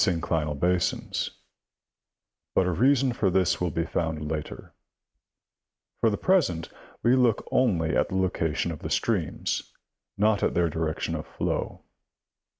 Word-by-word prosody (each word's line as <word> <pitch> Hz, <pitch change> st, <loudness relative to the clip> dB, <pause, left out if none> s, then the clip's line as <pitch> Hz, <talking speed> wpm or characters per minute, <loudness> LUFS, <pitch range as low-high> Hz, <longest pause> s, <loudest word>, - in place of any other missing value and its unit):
synclinal 80 Hz, -5 st, 0 dB
basins, 90 Hz, +1 st, 0 dB, 1.3 s
but 95 Hz, -, +4 dB
a 90 Hz, -, +1 dB
reason 130 Hz, -, +3 dB
for 105 Hz, -5 st, +1 dB
this 90 Hz, -1 st, +1 dB
will 90 Hz, -, +1 dB
be 85 Hz, +1 st, -1 dB
found 80 Hz, -2 st, -2 dB
later; 75 Hz, -2 st, -6 dB, 1.3 s
for 115 Hz, -, +4 dB
the 105 Hz, -, -1 dB
present 135 Hz, -, +1 dB, 0.3 s
we 120 Hz, +2 st, +5 dB
look 125 Hz, -4 st, +2 dB
only 85 Hz, -11 st, +2 dB
at -, -, +2 dB
the 95 Hz, -, -2 dB
location 85 Hz, -3 st, 0 dB
of 80 Hz, -, -6 dB
the -, -, -5 dB
streams, -, -, -1 dB, 0.5 s
not 105 Hz, 0 st, +3 dB
at -, -, +1 dB
their 85 Hz, -2 st, +2 dB
direction 80 Hz, 0 st, -2 dB
of -, -, -4 dB
flow. -, -, -3 dB
90 Hz, 140 wpm, -27 LUFS, 80-110 Hz, 1.3 s, we